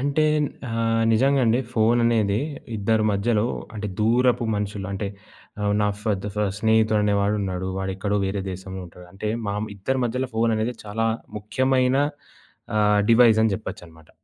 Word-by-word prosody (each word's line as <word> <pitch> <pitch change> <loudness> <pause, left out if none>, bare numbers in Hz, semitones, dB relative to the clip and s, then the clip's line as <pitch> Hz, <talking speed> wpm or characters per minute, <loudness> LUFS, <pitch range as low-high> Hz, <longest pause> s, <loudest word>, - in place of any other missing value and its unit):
అంటే 145 +3 +1 0.4
ఆహ్, 115 0 +1
నిజంగా 135 +4 +3
అండి 115 +3 +3
ఫోన్ 115 +1 +3
అనేది 110 -3 +2 0.4
ఇద్దరి 110 +2 +1
మధ్యలో 105 +2 +1 0.3
అంటే 105 -1 -4
దూరపు 120 +2 +3
మనుషులు 100 -1 -3
అంటే 100 +1 -3 0.5
ఆహ్, 105 0 +1
నా 105 - +2
ఫర్ 105 -3 0
ద - - -2
ఫ - - -2 0.2
స్నేహితుడు 110 -1 +3
అనే 105 0 +2
వాడు 105 +1 +1
ఉన్నాడు. 95 -1 -3
వాడెక్కడో 95 +2 -2
వేరే 95 0 -2
దేశంలో 95 +1 -7
ఉంటాడు. 90 +1 -14
అంటే, 105 +2 -4 0.2
మా 100 - -1 0.2
ఇద్దరి 130 +7 -1
మధ్యలో 125 +2 -2
ఫోన్ 115 0 +2
అనేది 115 +3 -1
చాలా 115 +2 -1 0.3
ముఖ్యమైన 130 +5 +1 0.8
ఆహ్, 105 -1 +4
డివైస్ 115 -2 +6
అని 110 -2 +2
జెప్పొచ్చనమాట. 80 -5 -9
110 Hz, 155 wpm, -23 LUFS, 100-115 Hz, 0.8 s, డివైస్